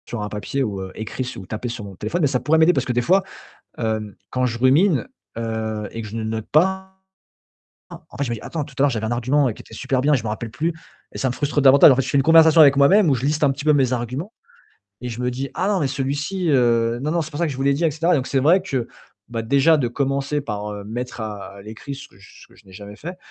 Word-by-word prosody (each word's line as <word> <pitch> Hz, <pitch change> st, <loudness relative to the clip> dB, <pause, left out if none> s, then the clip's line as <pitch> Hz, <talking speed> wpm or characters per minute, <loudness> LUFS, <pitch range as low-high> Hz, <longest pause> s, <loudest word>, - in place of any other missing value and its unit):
Sur 120 Hz, -, -5 dB
un 105 Hz, -, -4 dB
papier 105 Hz, +6 st, -3 dB
ou 100 Hz, -5 st, -3 dB
heu, 95 Hz, 0 st, -7 dB
écrit 125 Hz, +4 st, -5 dB
ou 95 Hz, -, -8 dB
tapé 110 Hz, +6 st, -5 dB
sur 115 Hz, -2 st, -6 dB
mon 100 Hz, -1 st, -10 dB
téléphone, 175 Hz, -, -3 dB
mais 150 Hz, -, +4 dB
ça 130 Hz, -2 st, 0 dB
pourrait 160 Hz, +5 st, +2 dB
m'aider 160 Hz, +3 st, +5 dB
parce -, -, -1 dB
que 125 Hz, -, -1 dB
des 120 Hz, -, +1 dB
fois, 190 Hz, +7 st, +3 dB, 0.6 s
hem, 110 Hz, -3 st, -2 dB, 0.2 s
quand 130 Hz, 0 st, 0 dB
je 120 Hz, -1 st, -3 dB
rumine, 140 Hz, -, +3 dB, 0.3 s
heu 110 Hz, -2 st, -3 dB
et 115 Hz, -, -6 dB
que 110 Hz, -, -8 dB
je 110 Hz, -, -7 dB
ne 115 Hz, -, -3 dB
note 110 Hz, 0 st, -4 dB
pas 190 Hz, +4 st, +2 dB, 1.0 s
pas, -, -, -12 dB
en -, -, -12 dB
fait, 140 Hz, -, 0 dB
je 125 Hz, -, -4 dB
me -, -, -1 dB
dis 110 Hz, -, -8 dB
attends, 160 Hz, -3 st, -4 dB
tout 140 Hz, -, -15 dB
à -, -, +3 dB
l'heure, 145 Hz, -, +4 dB
j'avais 110 Hz, -3 st, -3 dB
un 115 Hz, -, -2 dB
argument 130 Hz, +4 st, +1 dB
qui -, -, -13 dB
était -, -, -19 dB
super 130 Hz, +3 st, -1 dB
bien 145 Hz, +3 st, +2 dB
et -, -, +4 dB
je 115 Hz, -, -5 dB
me -, -, -2 dB
rappelle 110 Hz, +2 st, -4 dB
plus 160 Hz, +9 st, -2 dB, 0.4 s
et -, -, -8 dB
ça 130 Hz, -, 0 dB
me -, -, -2 dB
frustre 145 Hz, +3 st, -1 dB
davantage. 140 Hz, +1 st, +8 dB
En -, -, +4 dB
fait, 135 Hz, -, +1 dB
je 130 Hz, -, -6 dB
fais -, -, +1 dB
une 135 Hz, -, +4 dB
conversation 160 Hz, 0 st, +6 dB
avec 140 Hz, -2 st, +7 dB
moi-même 170 Hz, +7 st, +5 dB
où 140 Hz, -, +4 dB
je 125 Hz, 0 st, -3 dB
liste 150 Hz, +1 st, +1 dB
un 140 Hz, -, +4 dB
petit 140 Hz, +2 st, -8 dB
peu 155 Hz, -, +5 dB
mes 130 Hz, -3 st, +2 dB
arguments 125 Hz, -, -4 dB, 0.7 s
et 125 Hz, -, -5 dB
je 115 Hz, 0 st, -7 dB
me 125 Hz, -, 0 dB
dis: 135 Hz, +2 st, -4 dB
«Ah 190 Hz, -, -1 dB
non, 200 Hz, -3 st, +1 dB
mais 140 Hz, -, +1 dB
celui-ci, 145 Hz, +7 st, -2 dB
heu, 120 Hz, -4 st, +2 dB
non, 150 Hz, -, -1 dB
non, 170 Hz, 0 st, +1 dB
c'est 155 Hz, -, -6 dB
pour 145 Hz, -, -7 dB
ça 170 Hz, -, +2 dB
que 155 Hz, -, -2 dB
je 130 Hz, -, -7 dB
vous 135 Hz, -, -2 dB
l'ai 140 Hz, 0 st, +3 dB
dit 150 Hz, +5 st, -2 dB
et 165 Hz, -, +3 dB
cetera». 165 Hz, +4 st, +1 dB
Donc, 130 Hz, -3 st, -1 dB
c'est 135 Hz, -, +1 dB
vrai 165 Hz, +8 st, +4 dB
que 135 Hz, -10 st, -3 dB, 0.6 s
déjà 140 Hz, +7 st, +4 dB
de 130 Hz, -6 st, 0 dB
commencer 140 Hz, +3 st, -1 dB
par 105 Hz, -6 st, -5 dB
mettre 120 Hz, +3 st, -6 dB
à 100 Hz, -2 st, -7 dB
l'écrit 110 Hz, +7 st, -8 dB
ce 135 Hz, -, -11 dB
que -, -, -25 dB, 0.4 s
j'ai 95 Hz, -, -19 dB
jamais 100 Hz, +2 st, -10 dB
fait, 175 Hz, -, -8 dB
130 Hz, 285 wpm, -21 LUFS, 115-150 Hz, 1.0 s, davantage